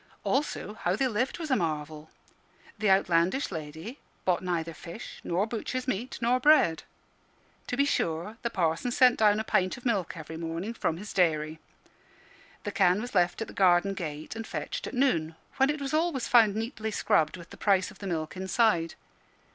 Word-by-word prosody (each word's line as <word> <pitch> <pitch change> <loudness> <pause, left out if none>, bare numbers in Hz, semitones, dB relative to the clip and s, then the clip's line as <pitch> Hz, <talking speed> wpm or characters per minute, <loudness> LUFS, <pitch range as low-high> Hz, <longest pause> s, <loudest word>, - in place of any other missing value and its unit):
Also 270 -6 -1
how 185 -4 -1
they 260 +5 +1
lived 245 +3 -1
was 320 -4 -5
a - - +5
marvel. 155 - -3 0.7
The 215 -1 +2
outlandish 190 +6 +2
lady 160 - -7 0.3
bought 180 -2 +2
neither 170 -3 -2
fish, 170 +7 -9
nor 180 +4 0
butcher's 245 +3 -4
meat, 245 +2 -2
nor 245 +2 +2
bread. 255 - +5 0.9
To 245 - -3
be 280 - +4
sure, 170 - -1
the 235 - -1
Parson 170 +1 0
sent 250 0 +4
down 210 -1 +4
a - - -1
pint 185 -2 +1
of 245 - -14
milk 195 -7 0
every 160 0 -7
morning 165 +6 -4
from 165 -7 -1
his 205 +3 -8
dairy; 160 -3 +1 1.0
the 205 - -3
can 185 -1 +3
was 245 +3 -6
left 180 +3 +2
at - - -10
the - - -11
garden 185 +1 +4
gate 155 -2 -6
and 225 0 -6
fetched - - -4
at - - -6
noon, 165 - +1 0.2
when 270 +1 +4
it 300 0 -1
was 275 +1 -4
always 315 -5 +1
found 220 -4 +5
neatly 220 0 -3
scrubbed, 160 -5 +1
with 170 -1 -13
the - - -9
price 195 -2 +2
of 200 - -17
the 200 - -6
milk 160 -2 -3
inside. 190 -3 +1
195 Hz, 185 wpm, -28 LUFS, 165-240 Hz, 1.0 s, a